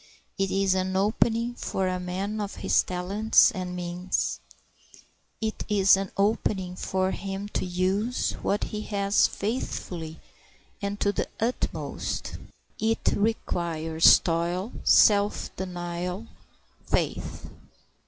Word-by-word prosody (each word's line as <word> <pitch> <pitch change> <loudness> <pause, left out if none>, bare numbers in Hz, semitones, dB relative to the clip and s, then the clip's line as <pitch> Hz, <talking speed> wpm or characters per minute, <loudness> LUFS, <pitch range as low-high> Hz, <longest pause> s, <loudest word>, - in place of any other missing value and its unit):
It 195 0 +1
is 195 0 +2
an 190 0 -1
opening 225 +4 +1
for 190 -5 -2
a 185 0 -1
man 195 +4 -3
of 205 -1 -4
his - - +2
talents 195 +7 +3
and 185 -4 -5
means. 180 +1 -2 1.0
It 220 -1 -3
is 195 -2 +6
an 195 0 -3
opening 195 -3 0
for 185 0 -1
him 195 +1 -4
to - - -2
use 190 +7 0
what 205 - 0
he 210 - -4
has 200 -1 +3
faithfully 180 -7 -4 0.6
and 200 0 -3
to 205 - +3
the - - -2
utmost. 235 +3 -3 0.4
It 225 +1 +1
requires 170 -7 +3
toil, 175 +5 -1
self 205 -1 +4
denial, 180 +2 -4 0.6
faith. - - -2
195 Hz, 115 wpm, -27 LUFS, 180-210 Hz, 1.0 s, is